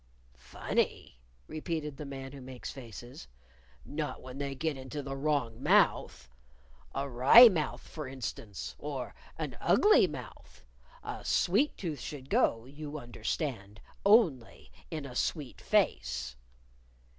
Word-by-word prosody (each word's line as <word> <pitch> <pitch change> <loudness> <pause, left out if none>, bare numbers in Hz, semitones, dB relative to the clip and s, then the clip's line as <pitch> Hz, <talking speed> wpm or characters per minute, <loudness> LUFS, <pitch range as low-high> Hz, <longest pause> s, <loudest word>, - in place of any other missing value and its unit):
"Funny?" - - -2 0.3
repeated 155 -2 -4
the 150 - -6
Man 135 -1 -7
Who 140 -1 -10
Makes 130 -1 -7
Faces. 120 - -10 0.6
"Not 150 0 -4
when 130 +1 -9
they 140 -1 -3
get 155 +2 -1
into 135 +2 -6
the 135 0 -5
wrong 135 -5 -1
mouth! 65 - +3 0.7
a 140 +1 -1
wry 140 - +9
mouth, 155 -8 -2
for 155 -4 -6
instance, 120 -5 -6
or 140 -4 -5 0.2
an - - -4
ugly 420 - +5
mouth. 115 - -10 0.4
A - - -6
sweet 215 +12 +2
tooth 160 -6 -4
should 135 -3 -8
go, 115 0 +2
you 145 +2 -7
understand, 120 -4 -4 0.2
only 195 - +3 0.2
with 155 -3 -4
a 130 - -8
sweet 145 -1 -2
face." 65 0 0
135 Hz, 125 wpm, -31 LUFS, 125-150 Hz, 0.7 s, wry